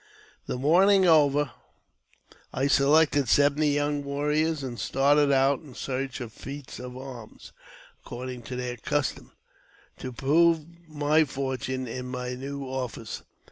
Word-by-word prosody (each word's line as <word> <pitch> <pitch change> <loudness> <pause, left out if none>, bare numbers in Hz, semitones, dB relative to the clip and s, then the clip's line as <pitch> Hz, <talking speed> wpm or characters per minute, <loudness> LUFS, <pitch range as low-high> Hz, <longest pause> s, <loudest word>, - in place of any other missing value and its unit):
The - - -2
mourning 185 +8 +4
over, 145 -4 +4 1.0
I 135 - -1
selected 145 -1 +4
seventy 145 +3 +4
young 145 0 0
warriors, 150 +2 0
and 120 -3 -5
started 140 +5 +3
out 135 0 +3
in 140 -6 -14
search 135 0 -4
of 115 -3 -7
feats 140 +3 -8
of 125 0 -8
arms 130 -4 -10 0.5
(according 125 0 -7
to 125 - -4
their 125 -1 -4
custom), 145 +4 -2 0.7
to 130 - -5
prove 160 +5 +3 0.2
my 150 +1 +3
fortune 130 -2 -3
in 125 +2 -5
my 125 0 -4
new 140 +2 -6
office. 125 -4 -5
140 Hz, 130 wpm, -27 LUFS, 130-145 Hz, 1.0 s, mourning